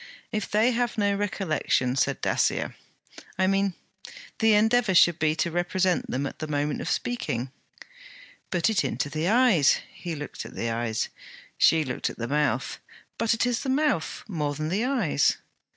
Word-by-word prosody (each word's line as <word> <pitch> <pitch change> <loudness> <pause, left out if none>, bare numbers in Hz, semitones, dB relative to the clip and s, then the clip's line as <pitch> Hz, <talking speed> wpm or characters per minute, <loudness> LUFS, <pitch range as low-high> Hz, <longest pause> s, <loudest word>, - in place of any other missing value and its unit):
'If 215 -1 -3
they 220 +4 +3
have 240 -1 -1
no 205 -1 +2
recollection,' 190 - 0
said 135 - 0
Dacier. - - 0 0.6
'I 190 - +2
mean, 195 0 +1 0.7
the 220 -1 +5
endeavour 220 -1 +3
should 175 -1 +5
be 155 0 +2
to 170 - -1
represent 175 +1 0
them 135 +3 -1
at - - -6
the 155 - -4
moment 145 0 -1
of - - -4
speaking.' 130 - -2 1.0
'Put 180 +4 +1
it 215 - +1
into 145 - -2
the 155 +3 -1
eyes.' 215 - +4 0.2
He 170 -2 -6
looked 145 0 -7
at - - -11
the 115 - -2
eyes. 115 -1 -2 0.5
She 160 -2 +4
looked 130 - -2
at - - -10
the 115 - -3
mouth. 140 -2 0 0.4
'But 230 0 +2
it 225 - +1
is 245 -2 0
the 270 - -3
mouth, 275 - 0
more 150 -7 -2
than 155 +2 -3
the 205 +7 0
eyes.' 225 - +2
175 Hz, 170 wpm, -26 LUFS, 145-220 Hz, 1.0 s, the